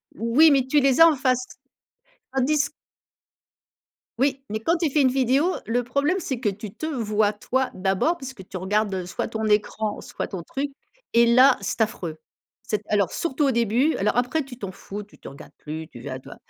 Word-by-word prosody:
Oui, 240 +9 +5
mais 270 -2 +3
tu 295 +3 +4
les 270 -1 +3
as 330 - +11
en 320 - +3
face, 255 -2 +1 0.9
tandis 285 +3 +2 1.5
Oui, 270 0 +1
mais 215 +1 -2
quand 325 +10 +1
tu 330 -3 0
fais 300 - +2
une 265 - +5
vidéo, 270 +7 +2
le 245 +2 0
problème 280 +9 0
c'est 265 -8 -4
que 220 - +2
tu 200 0 -7
te - - -6
vois 215 -8 +1
toi 255 +5 -1
d'abord, 195 - 0
puisque 260 - -9
tu 185 - -5
regardes, 205 +2 0
heu, 185 -1 -3
soit 180 - -4
ton 220 0 -3
écran, 210 0 0
soit - - -5
ton 185 -3 -6
truc 280 - -4 0.4
et 235 0 +6
là, 250 +3 +6
c'est 195 - -3
affreux. 175 -7 -2 0.5
Cet 210 -1 -2
alors 200 -4 +2
surtout 295 -3 0
au 275 - +3
début, 235 +6 +2
alors 210 +4 0
après 250 +6 +1
tu 260 -2 -11
t'en 200 -5 -6
fous, 200 +2 -8
tu 205 - -20
te - - -10
regardes 140 - -13
plus, 160 +1 -7
tu 120 - -12
vas 130 - -6
à - - -7
toi - - -12
235 Hz, 205 wpm, -24 LUFS, 205-275 Hz, 1.5 s, as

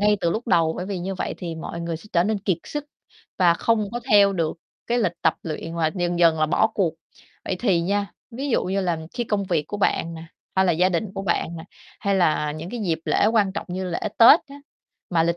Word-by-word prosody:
ngay 210 0 +4
từ 170 - +1
lúc 225 +7 -3
đầu. 165 -4 +3
Bởi 180 - -4
vì 195 -2 -3
như 190 +2 -3
vậy - - -3
thì 170 -3 -5
mọi 165 +1 -6
người 170 -1 -3
sẽ 165 - -15
trở 170 0 +3
nên 215 +1 0
kiệt 190 -3 -1
sức 295 -1 -5 0.5
và 175 -3 +5
không 215 +2 0
có 240 - -3
theo 200 -1 +6
được 165 -3 -1 0.3
cái 240 +1 +1
lịch 175 -7 -1
tập - - +3
luyện 165 0 -5
và 160 -2 +1
dần 175 -2 -1
dần 165 -2 +5
là 155 - +4
bỏ 165 - +3
cuộc. 175 -6 +1 0.5
Vậy 185 - -2
thì 190 -7 +2
nha, 200 +3 -1 0.2
ví 265 +5 -4
dụ - - +2
như 195 +2 0
là 175 -3 0 0.2
khi 240 - -1
công 210 -3 -1
việc 170 -5 0
của 205 - -4
bạn 170 -4 0
nè, 160 - -8 0.3
hay 190 - +4
là 180 - +3
gia 180 +3 +3
đình 190 +2 -2
của 195 - -4
bạn 170 -2 -1
nè, 160 - -8 0.4
hay 200 -2 +1
là 155 -5 +2
những 160 +4 -7
cái 240 - -5
dịp 170 -6 0
lễ - - +2
quan 215 -3 +2
trọng - - -5
như 185 +1 -3
lễ 175 -2 -3 0.2
Tết 235 +8 +9
á, 280 - -11 0.5
mà 170 -3 +3
lịch 170 +1 +1
185 Hz, 255 wpm, -23 LUFS, 170-205 Hz, 0.5 s, Tết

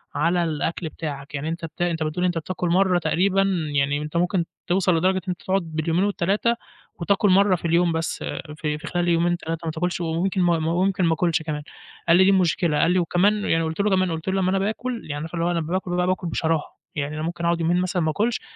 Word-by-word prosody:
على 175 +1 +2
الأكل 160 +1 -2
بتاعك، 145 -2 -6
يعني 150 +3 -3
أنت 165 0 -4
بت 165 - -10
أنت 165 -2 0
بتقول 160 +4 -1
أنت 175 -2 0
بتاكل 180 +2 -3
مرّه 180 0 +3
تقريبًا 195 +3 +2 0.3
يعني 140 +1 +1
أنت 150 +2 -4
ممكن 175 0 +1 0.2
توصل 180 -1 +2
لدرجة 185 +3 +2
إن - - -2
أنت 180 - -3
تقعد 190 +1 +1
باليومين 165 +2 -1
وال3 205 +4 +1 0.4
وتاكل 200 +3 +2
مرّه 195 0 +5
في 170 - -7
اليوم 170 +1 +3
بس 160 0 -2 0.4
في 150 -1 -2
في 150 - -9
خلال 175 0 -1
يومين 170 +1 +2
3 165 0 -5
ماتاكلش، 175 +3 -2
وممكن 175 +3 0
وممكن 175 +3 +1
ما 165 - +3
آكُلش 165 0 +1
كمان، 150 -2 -4 0.4
قال 170 +1 +6
لي 190 - +6
دي 195 - +5
المشكلة، 175 -4 +2
قال 170 - +3
لي 185 - +3
وكمان 200 +5 +2
يعني 165 0 +2
وقُلت 160 +3 -4
له 210 - +2
كمان 185 -2 +2
قُلت 160 +1 -5
له 190 0 +1
لمّا 185 - +1
أنا 195 - +1
باكل 230 +4 -2
يعني 145 - -5
عارفة 165 +2 -6
اللي 165 - 0
هو 175 - +1
أنا 170 -1 0
باكُل، 180 +3 -3
باكُل 180 0 0
بشراهة، 160 -1 -1 0.2
يعني 150 +1 -3
أنا 155 - -4
ممكن 170 +1 -3
أقعد 170 0 +1
يومين 175 +2 +2
مثلًا 185 0 -1
ما 155 -1 +1
آكلش، 220 +8 0
175 Hz, 225 wpm, -23 LUFS, 160-185 Hz, 0.4 s, قال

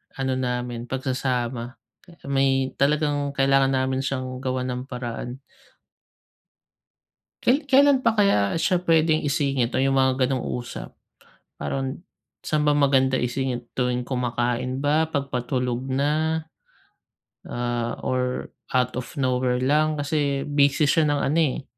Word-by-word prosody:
ano 135 -1 -1
namin, 125 -1 -3
pagsasama. 125 -2 -2 0.2
Pe 175 -2 -18 0.2
may 135 -1 +2
talagang 145 0 +1
kailangan 135 0 +3
namin 130 0 0
siyang 130 -1 -3
gawan 130 -1 -2
ng 125 0 -3
paraan. 125 +1 -6 2.0
Kai 280 +4 +2
kailan 275 -1 +4
pa 230 - +4
kaya 200 - +3
siya 180 +1 0
pwedeng 160 -2 +3
isingit 140 -4 0
o 130 - +1
'yung 135 0 +2
mga 130 0 +3
gano'ng 130 -3 -1 0.2
usap? 120 - -8 0.6
Parang 135 - -4 0.4
saan 150 -1 0
ba 145 - +4
maganda 135 -2 +3
isingit? 125 -1 -2
Tuwing 125 -1 +1
kumakain 125 +1 -2
ba? 150 +2 +2
'Pag 140 -3 -3
patulog 125 0 -2
na? 150 +4 0 1.0
Ah, 120 -1 -2
or 125 0 -2 0.2
out 125 0 +1
of 125 - -7
nowhere 125 -2 0
lang? 155 +3 +2
Kasi 145 -2 0
busy 145 0 +3
siya 160 -2 +3
ng 145 - -1
ano, 150 +4 +1
eh 145 -4 +1
135 Hz, 130 wpm, -24 LUFS, 125-145 Hz, 2.0 s, kailan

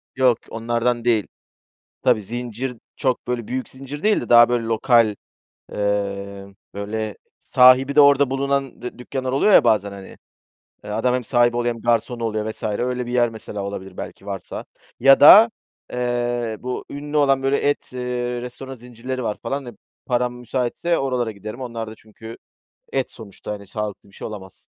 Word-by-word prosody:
Yok, 130 -3 +4
onlardan 120 +1 -1
değil. 110 -4 +2 0.8
Tabii, 120 -4 +3
zincir 120 +3 -5 0.2
çok, 130 -3 -1
böyle, 120 -3 -3
büyük 130 +1 -3
zincir 135 +2 -9
değil 215 0 +3
de - - -7
daha, 120 0 +8
böyle, 120 -1 0
lokal, 115 -1 +3 0.6
eee, 100 -1 -3 0.2
böyle, 105 +1 -4 0.3
sahibi 130 +2 +5
de 150 - +8
orada 140 -1 +5
bulunan 135 -1 -1
dü 125 - -7
dükkânlar 130 +1 -4
oluyor 195 +10 +3
ya - - +8
bazen, 105 -4 +2
hani. 100 -1 -11 0.7
Adam 115 +4 0
hem 125 -2 -1
sahibi 120 0 +3
oluyor 120 0 0
hem 115 - -11
garson 120 +1 0
oluyor 110 -1 -2
vs. 110 - -11
öyle 125 +3 -2
bir 120 - -5
yer 120 -1 +3
mesela 110 -2 -7
olabilir 95 -2 -7
belki 95 - -8
varsa 100 -2 -6 0.4
ya 135 +2 +7
da, 215 +10 +10 0.4
eee, 120 -2 -1
bu 125 0 -4
ünlü 145 +1 -5
olan, 135 -2 +3
böyle, 135 +1 +2
et, 145 -2 -1
eee, 125 -1 -3
restoranı 130 +2 -8
zincirleri 125 +2 -6
var 105 -2 -2
falan. 140 -1 -3
Eee, 120 - -7 0.3
param 125 -1 0
müsaitse 125 +7 -1
oralara 125 -4 -1
giderim, 110 +5 -8
onlar 115 -3 -5
da 110 - -9
çünkü 110 +1 -12 0.6
et 135 -1 -1
sonuçta, 105 -2 -9
hani, 100 -2 -7
sağlıklı 105 -1 -5
bir - - -23
şey - - -6
olamaz. 95 -3 -9
120 Hz, 170 wpm, -22 LUFS, 110-130 Hz, 0.8 s, da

